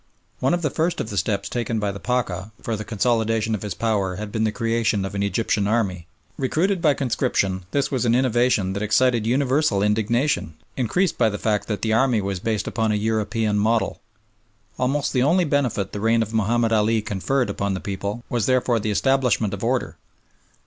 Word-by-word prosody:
One 135 +7 +2
of 175 - -4
the 150 - 0
first 165 +4 0
of 110 - -4
the 100 - -4
steps 100 +1 0
taken 120 -2 -2
by 105 -2 -1
the 100 - -8
Pacha 105 -6 -2
for 115 - -2
the 110 - -5
consolidation 110 0 0
of 105 - -2
his 105 -2 -4
power 100 -5 0
had 105 +2 -6
been 110 0 0
the 110 - +1
creation 115 -3 0
of 95 - -6
an 100 - -2
Egyptian 100 0 0
army. 95 -6 -1 0.3
Recruited 170 +8 0
by 150 -4 +4
conscription, 95 -7 -1
this 140 +4 0
was 130 -3 0
an 120 -1 +3
innovation 120 -6 +2
that 100 - -3
excited 115 +1 +2
universal 130 -4 +2
indignation, 110 - 0 0.2
increased 155 - 0
by 110 - +4
the 105 - -4
fact 105 -1 -1
that 105 -3 -3
the 110 -1 +1
army 120 0 +3
was 95 -2 -3
based 110 0 -1
upon 110 -2 0
a - - +1
European 110 0 0
model. 110 +2 0 0.8
Almost 135 +3 0
the 125 - +2
only 170 +7 +3
benefit 130 -10 0
the 105 - -5
reign 115 +2 +2
of 110 0 -8
Mahomed 115 +1 +1
Ali 110 0 +2
conferred 110 +3 -1
upon 100 -1 -2
the - - -3
people 100 +4 -4
was 120 -4 -1
therefore 125 -2 +2
the 110 - -2
establishment 125 -3 +1
of 100 - -5
order. 125 +2 -1
110 Hz, 195 wpm, -23 LUFS, 105-125 Hz, 0.8 s, by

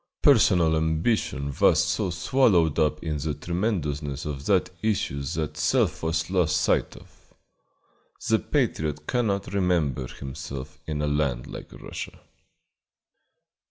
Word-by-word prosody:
Personal 90 - +5
ambition 80 - 0
was 80 0 +5
so 85 +4 0
swallowed 85 - +2
up 75 -1 +1
in 80 -2 -2
the 75 +1 -2
tremendousness 75 -5 -2
of 70 -2 -5
that 95 -3 +2
issue 100 -10 0
that 75 +3 -3
self - - +1
was 80 +1 -1
lost 90 -4 +2
sight - - +1
of. - - -20 0.9
The - - +3
patriot 75 -1 -1
cannot 100 -5 -1
remember 85 -9 +1
himself 70 +3 -8
in 75 -1 -2
a - - +1
land 70 -4 0
like - - -9
Russia. - - -8
80 Hz, 125 wpm, -26 LUFS, 75-90 Hz, 0.9 s, Personal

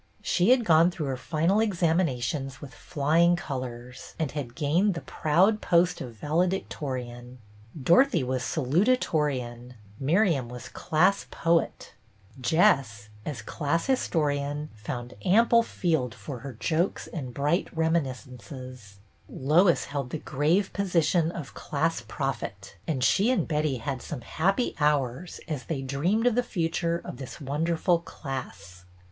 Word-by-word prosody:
She 180 +3 +2
had 250 -2 +5
gone 165 0 +6
through 165 -4 -4
her 135 -1 -2
final 165 - +1
ex 205 -6 -1
aminations 135 -5 0
with 140 -3 -10
flying 165 +3 +2
colors, 125 -5 -7
and 155 -4 -1
had 135 -6 -5
gained 170 +6 +2
the 165 - -4
proud 185 +8 +2
post 170 +1 +2
of 120 -3 -7
Valedictorian; 130 - -2 0.4
Dorothy 215 - +4
was 130 0 -1
Salutatorian; 135 - 0 0.2
Miriam 150 - +2
was 125 -1 -8
Class 180 +5 +1
Poet; 170 0 0 0.5
Jess, 115 - +2 0.2
as 130 -8 -4
Class 155 +7 -1
Historian, 150 - 0
found 120 +3 -6
ample 230 +5 +5
field 160 - -1
for 135 -5 -7
her 135 +1 -7
jokes 165 - -1
and 135 -7 -6
bright 145 +8 0
reminiscences; 130 - -3 0.3
Lois 165 +6 +3
held 140 -3 -4
the 160 - -3
grave 155 +8 0
position 170 -4 +1
of 155 -6 -7
Class 160 0 -1
Prophet, 105 -7 -4
and 135 -6 -1
she 195 - +3
and 255 - +1
Betty 150 -4 0
had 130 +2 -4
some 145 -5 -6
happy 195 - 0
hours 150 +1 0
as 150 -5 -4
they 140 -5 -3
dreamed 165 - 0
of 245 - +4
the 245 - +2
future 170 -5 -1
of - - -7
this 135 -2 -8
wonderful 165 +5 +1
class. 130 - -8
150 Hz, 135 wpm, -27 LUFS, 130-170 Hz, 0.5 s, gone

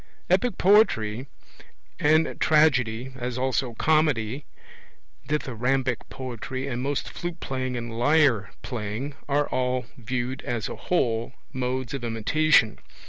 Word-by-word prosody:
Epic 245 -7 +2
poetry 130 - +3 0.7
and 155 +2 +3
Tragedy, 130 -5 +3
as 125 -1 -4
also 130 -2 0
Comedy, 145 -5 +1 0.8
Dithyrambic 130 -3 -1
poetry, 130 +1 -5
and 125 -2 -3
most 140 +1 -1
flute 175 -1 -5
playing 130 -1 -3
and 120 -1 -5
lyre 125 -5 +3
playing, 120 +3 -4 0.2
are 145 +1 +2
all, 125 -1 0
viewed 125 +3 -3
as 120 -4 -2
a - - -5
whole, 120 -8 0 0.2
modes 130 -1 -2
of 135 -3 -4
imitation. 115 +2 +3
130 Hz, 115 wpm, -26 LUFS, 120-145 Hz, 0.8 s, poetry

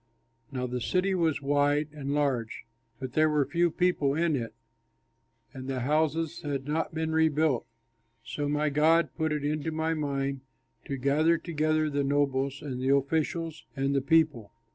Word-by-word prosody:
Now 125 -2 -2
the 125 0 -3
city 185 +8 +1
was 160 -5 0
wide 145 +1 +2
and 140 -2 -4
large, 130 -6 -1 0.4
but 130 -1 -6
there 155 +1 +4
were 150 -2 +2
few 170 +5 +2
people 160 -5 +1
in 165 -1 +1
it, 115 -3 -4 1.0
and 130 -1 -8
the 130 -2 -2
houses 155 +4 0
had 140 -2 -3
not 160 +2 -2
been 160 0 -1
rebuilt. 160 -4 +2 0.6
So 145 -1 -3
my 150 0 +1
God 160 +3 +4
put 160 -1 -1
it 150 -1 -1
into 150 +2 -1
my 160 +1 -1
mind 140 -3 -2 0.4
to 135 - -3
gather 150 +6 +3
together 155 -1 0
the 145 -1 0
nobles 140 -1 0
and 130 -4 -4
the 135 +2 +3
officials 160 +3 -1
and 135 0 0
the 140 - +2
people. 145 -7 +2
145 Hz, 165 wpm, -28 LUFS, 140-160 Hz, 1.0 s, there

